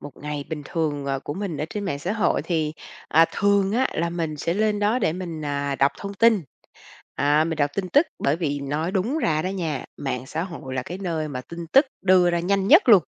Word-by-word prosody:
Một 145 - -10
ngày 145 -1 -5
bình 150 -2 -4
thường, 145 -4 -2
à, 135 -1 -1
của 145 - -6
mình 190 -5 -4
ở 150 - -1
trên 205 -1 -4
mạng 140 -7 -2
xã 180 +7 -2
hội 215 -5 +1
thì, 155 -3 -1 0.4
à, 165 +2 +6
thường 200 0 +2
á, 255 +3 +2
là 170 +1 -1
mình 165 -3 -3
sẽ 170 +4 -1
lên 210 0 +1
đó 210 +4 +2
để 175 -8 +1
mình, 170 -4 -5
à, 140 -1 -1
đọc 140 +1 +3
thông 200 0 -6
tin, 225 -2 +4 0.7
à, 145 +2 +3
mình 160 -1 -2
đọc 145 -1 +1
tin 190 -2 -2
tức. 290 - +4
Bởi 140 - +1
vì 145 -4 -2
nói 150 +5 -2
đúng 225 +11 0
ra 155 - +1
đó 185 - -1
nha, 165 -7 -3
mạng 130 -2 -4
xã 165 - -3
hội 165 -8 -7
là 130 - -1
cái 180 +8 -7
nơi 165 -5 -2
mà 130 -3 -4
tin 170 +5 -8
tức 275 +2 +6 0.2
đưa 185 -2 +5
ra 170 0 0
nhanh 195 +2 0
nhất 315 - +7
luôn. 205 -6 +8
170 Hz, 240 wpm, -24 LUFS, 145-195 Hz, 0.7 s, luôn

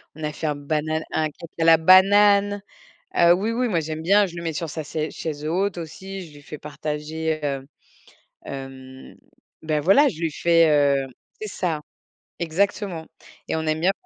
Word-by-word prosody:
on 155 - -9
a 150 0 -2
fait 155 - -4
un 150 - 0
banana 155 +2 -2
un 155 -1 0
cake 165 +3 -12
à - - +2
la 165 0 +7
banane. 200 +3 +5 0.5
Heu, 170 0 +6
oui, 205 +5 -1
oui, 245 +1 0
moi, 175 -6 +1
j'aime 155 0 -5
bien, 200 +4 +4
je 175 -2 -9
le 170 - -5
mets 165 -1 -2
sur 160 +1 -4
sa 155 +1 -5
sai 155 +1 -3
chaise 150 -2 -5
haute 185 +4 0
aussi, 190 +3 -7
je 150 - -17
lui 145 - -13
fais 150 - -8
partager, 155 +1 -4
heu, 135 -1 -3 0.8
hem, 130 -1 -9 0.5
ben 155 -1 0
voilà, 200 - +5
je 160 - -9
lui 165 -2 0
fais, 165 0 +3
heu 140 -2 +3 0.4
c'est 215 - -4
ça, 165 -6 -2 0.6
exactement. 175 0 -1 0.4
Et - - -1
on 160 - -1
aime 155 0 0
bien 185 +2 +4
160 Hz, 190 wpm, -23 LUFS, 150-185 Hz, 0.8 s, la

